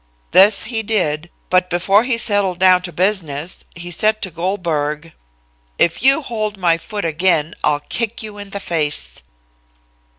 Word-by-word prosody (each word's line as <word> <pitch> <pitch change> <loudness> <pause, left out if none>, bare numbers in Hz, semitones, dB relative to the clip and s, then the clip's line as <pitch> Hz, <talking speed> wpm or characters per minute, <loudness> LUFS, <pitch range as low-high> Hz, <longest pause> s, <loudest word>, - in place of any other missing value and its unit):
This 200 +2 +6
he 225 -1 -2
did, 175 -7 -1 0.2
but 180 0 +3
before 195 +5 +2
he 245 -2 0
settled 205 -5 +2
down 185 0 +5
to 180 0 -6
business, 175 -5 -2
he 175 +1 -7
said 215 +5 +2
to 190 - -3
Goldberg: 165 -3 -3 0.6
"'If 170 - +1
you 270 +4 +4
hold 215 -4 -3
my 170 -3 +2
foot 205 +1 -5
again, 165 -1 +1
I'll 145 -1 +1
kick 230 +8 -3
you 210 -1 -9
in 205 -1 -9
the 200 - -5
face.' 155 -6 -1
185 Hz, 155 wpm, -18 LUFS, 165-210 Hz, 0.6 s, This